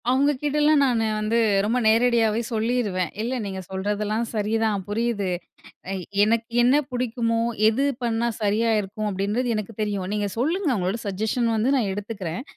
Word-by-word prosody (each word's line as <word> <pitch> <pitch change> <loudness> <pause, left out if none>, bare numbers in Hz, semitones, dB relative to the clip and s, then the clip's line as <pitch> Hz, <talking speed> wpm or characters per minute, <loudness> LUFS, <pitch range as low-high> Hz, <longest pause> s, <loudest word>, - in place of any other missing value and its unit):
அவங்கக்கிட்டலாம் 295 +3 +3
நானு 240 -4 +2
வந்து 215 +2 +1 0.2
ரொம்ப 225 +4 +1
நேரடியாவே 225 -1 +3
சொல்லிருவேன். 220 -6 0
"இல்ல 240 +3 -2
நீங்க 190 -1 -4
சொல்றதெல்லாம் 210 +3 -1
சரி 215 -1 -1
தான். 215 -3 +1
புரியுது. 210 -1 -1 0.7
எ - - -2 0.3
எனக்கு 225 +2 +1 0.2
என்ன 250 +4 +5
புடிக்குமோ 235 -2 -1 0.3
எது 240 +5 +1 0.2
பண்ணா 235 0 0
சரியா 215 +2 +1
இருக்கும் 210 +2 -5
அப்பிடின்றது 205 +6 -1
எனக்கு 215 +1 -4
தெரியும். 205 -3 -1
நீங்க 210 -1 0
சொல்லுங்க 325 - 0
உங்களோட 190 +3 -1
சஜஷன் 220 +4 0
வந்து 225 +5 +1
நான் 230 -6 +1
எடுத்துக்கிறேன். 200 -1 -5
225 Hz, 145 wpm, -24 LUFS, 205-240 Hz, 0.7 s, என்ன